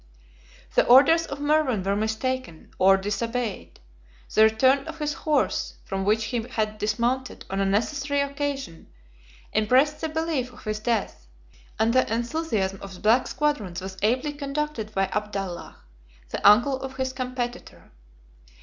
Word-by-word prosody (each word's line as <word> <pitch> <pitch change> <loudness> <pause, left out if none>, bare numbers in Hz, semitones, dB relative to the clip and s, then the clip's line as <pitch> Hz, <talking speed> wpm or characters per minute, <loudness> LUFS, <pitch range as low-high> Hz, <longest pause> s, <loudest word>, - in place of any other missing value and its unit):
The - - +4
orders 305 +7 +6
of 280 - -5
Mervan 290 -8 +1
were 195 +1 0
mistaken, 220 -2 -3
or 195 +1 +6
disobeyed: 210 - -3 0.5
the 215 - +4
return 260 +5 +4
of - - -7
his 300 -1 -2
horse, 305 -2 0
from 195 -1 -3
which 215 +2 +2
he 240 - +1
had 215 -3 -3
dismounted 240 +5 -1
on 195 - -1
a 195 - +1
necessary 280 +8 0
occasion, 280 - -4 0.7
impressed 255 +8 +3
the 320 - -2
belief 315 -5 -2
of 245 - -15
his 215 -1 -3
death; 215 - -2 0.5
and 225 +1 +2
the 255 -3 +2
enthusiasm 230 -6 -1
of 195 -1 -8
the - - -13
black 225 +4 +3
squadrons 230 - -1
was 190 0 -7
ably 255 +7 +1
conducted 285 -5 -3
by 195 -2 +1
Abdallah, 195 -2 -4 0.5
the 200 - +4
uncle 250 +6 +4
of 265 0 -6
his 260 0 -2
competitor. 255 -1 -5
240 Hz, 145 wpm, -25 LUFS, 210-275 Hz, 0.7 s, orders